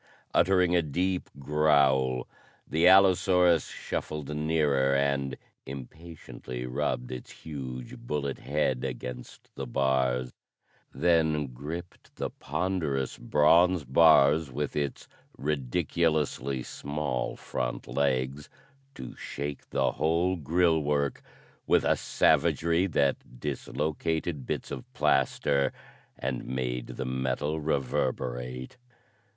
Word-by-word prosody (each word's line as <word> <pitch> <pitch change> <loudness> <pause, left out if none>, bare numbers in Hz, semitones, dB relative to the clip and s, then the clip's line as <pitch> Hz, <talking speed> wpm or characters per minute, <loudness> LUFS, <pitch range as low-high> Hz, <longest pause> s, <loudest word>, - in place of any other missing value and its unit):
Uttering 90 0 +4
a 85 - +4
deep 90 +4 -1
growl, 70 -3 +2 0.4
the 80 +3 +3
allosaurus 90 -3 +5
shuffled 75 -1 -5
nearer, 75 -3 +2
and 70 -1 0 0.3
impatiently 65 -3 -8
rubbed 65 -1 -2
its 65 -1 -7
huge, 65 -5 -7
bullet 70 +2 -3
head 65 -3 0
against 65 -1 -7
the - - -5
bars; 65 -1 +1 0.6
then 80 -3 +2
gripped 80 +7 -8
the - - -3
ponderous 75 -4 -2
bronze 80 +5 +4
bars 75 +1 +5
with 70 +2 -3
its 70 -2 -3 0.3
ridiculously 75 -1 0
small 70 -3 -3
front - - -4
legs 70 +1 -1 0.5
to 65 - -8
shake 70 0 -6
the - - +1
whole 85 +5 +1
grille 85 +1 +2
work 70 -1 0 0.5
with - - +4
a - - +4
savagery 85 +3 +2
that 70 -6 -1
dislocated 75 +1 -2
bits - - -3
of 65 - -7
plaster 70 +1 +2 0.5
and 65 -1 -3
made 60 -1 -2
the 65 - -5
metal 65 +4 -1
reverberate. 65 - -2
70 Hz, 100 wpm, -28 LUFS, 65-80 Hz, 0.6 s, allosaurus